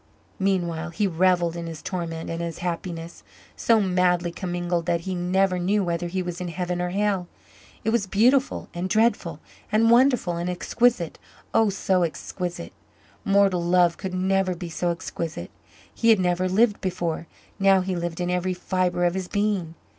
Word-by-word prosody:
Meanwhile 175 -4 0
he 170 +5 -1
revelled 175 -1 +2
in 170 -1 -5
his 160 -2 -8
torment 165 -3 -4
and 165 0 -4
his 170 -1 -4
happiness 170 - -4 0.3
so 230 -1 +3
madly 180 -3 +2
commingled 175 -2 -2
that 170 -1 +1
he 190 +2 -4
never 180 +1 +1
knew 200 +3 +1
whether 175 -1 -2
he 185 +1 -2
was 175 0 -5
in 180 - -3
heaven 175 +1 -3
or 180 - -1
hell. 195 -1 0 0.6
It 220 - +1
was 225 -4 +1
beautiful 250 +7 +2
and 180 +2 -3
dreadful 225 +3 +1 0.3
and 225 +2 +4
wonderful 240 -8 +4
and 175 +1 -2
exquisite 180 0 +1 0.3
oh, 225 -2 +4
so 190 -1 +1
exquisite. 175 - -4 0.5
Mortal 195 -2 +3
love 175 0 +3
could 190 -2 -5
never 190 0 +1
be 175 0 -7
so 175 +2 -1
exquisite. 170 -1 -4 0.4
He 230 - +1
had 220 -3 +6
never 180 0 +1
lived 210 +3 +3
before 175 -3 -2 0.3
now 195 -1 +5
he 185 0 -2
lived 170 -1 -3
in 180 0 -1
every 180 +1 0
fibre 180 -1 0
of 175 - +2
his 190 -1 -3
being. 200 -6 -1
180 Hz, 170 wpm, -24 LUFS, 175-195 Hz, 0.6 s, had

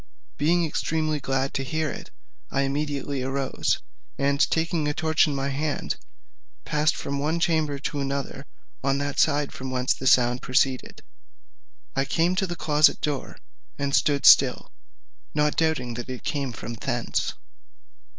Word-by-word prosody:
Being 170 +4 +2
extremely 155 -1 -1
glad 135 0 -1
to 135 - -1
hear 155 +2 -1
it, - - -8 0.4
I 135 - 0
immediately 140 0 -2
arose, 135 +1 -1 0.4
and 140 0 +1
taking 160 -1 0
a 150 - -1
torch 160 -1 +3
in 145 - -2
my 135 0 -1
hand, 145 +2 -2 0.7
passed 150 +1 +1
from 140 0 -3
one 155 +4 0
chamber 155 -4 +1
to 140 +1 -4
another 140 0 -3 0.4
on 135 0 +1
that 145 0 -2
side 145 -2 +2
from 130 0 -6
whence 130 0 +1
the 130 - -4
sound 125 -1 +4
proceeded. 130 0 0 0.9
I 135 - +1
came 170 +5 +1
to 190 -1 +1
the 175 - -4
closet 155 -1 +3
door, 145 -3 -3 0.4
and 140 0 -2
stood 145 -2 +2
still, - - +6 0.6
not 150 0 +2
doubting 155 -7 0
that 120 +2 -6
it 130 -1 -6
came 140 -4 -2
from 120 0 -7
thence. 115 - -2
140 Hz, 150 wpm, -25 LUFS, 135-155 Hz, 0.9 s, still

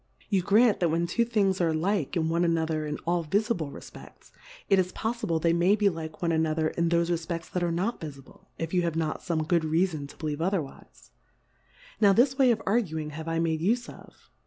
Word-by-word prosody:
You 195 -3 +2
grant, 215 +4 +4
that 175 - +2
when 165 +2 +1
two 235 +8 +1
things 200 -5 +1
are 165 -2 +2
like 180 -1 -1
one 165 +1 +1
ano 165 -1 +1
ther 155 -1 -2
in 150 - -3
all 170 0 +1
vifible 195 - -1
refpeSs, - - -13 0.4
it 195 -1 +4
is 180 0 0
pofEble 220 -7 -2
they 165 +1 +2
may 175 +4 +3
be 205 -1 +3
like 160 -1 -7
one 170 - +2
another 160 -1 +1
in 170 +1 -1
thofe 170 0 +1
Refpects 165 0 -3
that 180 - -2
are 175 - +1
not 190 +8 -2
vifible, 140 -4 -11
if 165 +1 -4
you 180 - +3
have 170 -2 -1
not 160 -1 -2
fome 160 -3 -2
good 170 0 +3
Reafon 160 -2 0
to - - -14
believe 155 -1 -4
other 185 -1 +1
wife: 135 - -15 0.9
Now 200 -2 +6
this 255 +6 +3
way 265 -2 +4
of 225 -2 +1
arguing 160 -8 -1
have 160 +2 -7
I 165 0 -1
made 160 -1 0
ufe 235 +7 0
of. - - -18
170 Hz, 215 wpm, -27 LUFS, 160-195 Hz, 0.9 s, Now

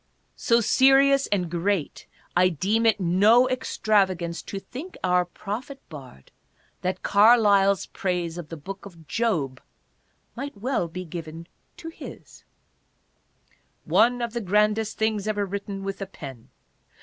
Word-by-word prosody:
So 235 -4 +2
serious 270 +3 +4
and 185 -4 0
great 175 0 -2 0.3
I 180 +1 +5
deem 205 +8 +1
it 220 - +3
no 205 +8 +4
extravagance 195 -9 0
to 195 - -7
think 280 - -9
our 180 -1 +2
prophet 220 +10 -7
bard, 130 - -12 0.5
that 185 0 -3
Carlyle's 200 -2 +5
praise 175 -2 -3
of 160 -3 -9
the 165 - -7
Book 195 +7 -8
of 165 -5 -16
Job 160 - -1 0.7
might 275 -2 -6
well 230 -4 -1
be 180 +2 -7
given 165 0 -8 0.3
to 325 - -8
his: 330 - -12 0.7
" - - -41
One 245 +2 +4
of 235 -1 -3
the 235 - -2
grandest 210 +2 +1
things 215 -2 0
ever 205 -1 0
written 200 0 -5
with 195 0 -5
a 195 - -4
pen. 135 -11 -10
200 Hz, 135 wpm, -25 LUFS, 175-225 Hz, 0.7 s, I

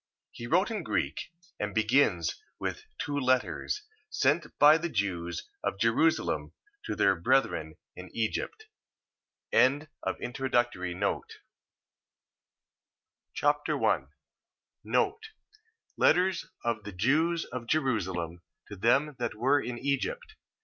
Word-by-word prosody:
He 120 - -8
wrote 185 - +2
in 215 - -2
Greek, - - -2 0.3
and 105 -1 -3
begins 110 - +2 0.2
with - - -4
two 145 - -3
letters, 130 - 0 0.3
sent 150 +4 +1
by 150 +2 +7
the 170 +1 -2
Jews 85 - -2 0.2
of - - -1
Jerusalem 115 +10 +1 0.3
to - - -3
their - - +4
brethren - - +1 0.2
in - - -9
Egypt. 435 0 -3 0.9
2 140 +5 +4 0.2
Machabees 120 - -1 2.1
Chapter - - +1
1 - - +1 1.9
Letters 180 -1 +3 0.2
of 115 -3 -1
the 105 - -7
Jews 155 - +2
of 125 -2 -7
Jerusalem 95 - -1 0.3
to 100 - -7
them 135 +9 +2
that 120 -2 -2
were 135 +6 +3
in 120 -1 -5
Egypt. 435 - -2
130 Hz, 105 wpm, -29 LUFS, 105-155 Hz, 2.1 s, by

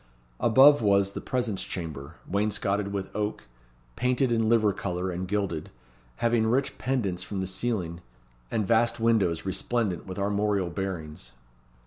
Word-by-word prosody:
Above 135 +5 +6
was 100 -2 +3
the - - -6
presence 120 -6 -2
chamber, 80 -4 -6
wainscotted 100 0 0
with 100 -1 -5
oak, 105 0 -2 0.5
painted 125 +1 +1
in 115 -1 +2
liver 110 -3 +4
colour 90 0 -3
and 90 +1 -4
gilded, 95 -5 -2 0.5
having 115 - +2
rich 130 +4 +1
pendents 115 -9 -1
from 100 - -4
the 95 - -1
ceiling, 95 -3 -2 0.5
and 110 - 0
vast 115 +2 +2
windows 105 -8 +2
resplendent 95 0 -1
with 95 - -6
armorial 100 -2 0
bearings. 80 -10 -5
100 Hz, 135 wpm, -27 LUFS, 95-115 Hz, 0.5 s, Above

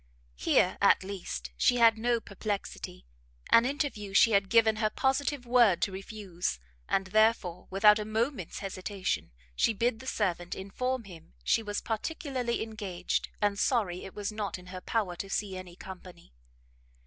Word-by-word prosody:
Here, - - +2
at - - +5
least, 175 - -5
she 245 - +4
had 230 -1 +6
no 235 +1 +1
perplexity; 200 - -5 0.5
an 230 - +7
interview 255 -8 -2
she 225 - +6
had 200 -2 +3
given 225 -2 +4
her 215 -1 +1
positive 270 +2 0
word 235 -6 +5
to 200 - +1
refuse, 190 - -4 0.3
and 195 - +1
therefore, 195 -3 +2
without 210 +2 +6
a - - -2
moment's 220 - -2
hesitation, 185 - -3 0.2
she 225 - +3
bid 225 +2 0
the 260 - -10
servant 175 -7 -1
inform 250 +6 -3
him 170 - -13
she 225 - +3
was 205 -1 -3
particularly 250 0 -2
engaged, 205 -5 -3
and 205 -1 +1
sorry 200 -9 +1
it 190 - -10
was 205 0 -3
not 210 -3 -3
in 180 0 -14
her 185 - -6
power 200 -5 -1
to 195 - -5
see 195 -1 -2
any 185 -2 -8
company. 180 - -11
205 Hz, 160 wpm, -30 LUFS, 185-230 Hz, 0.5 s, an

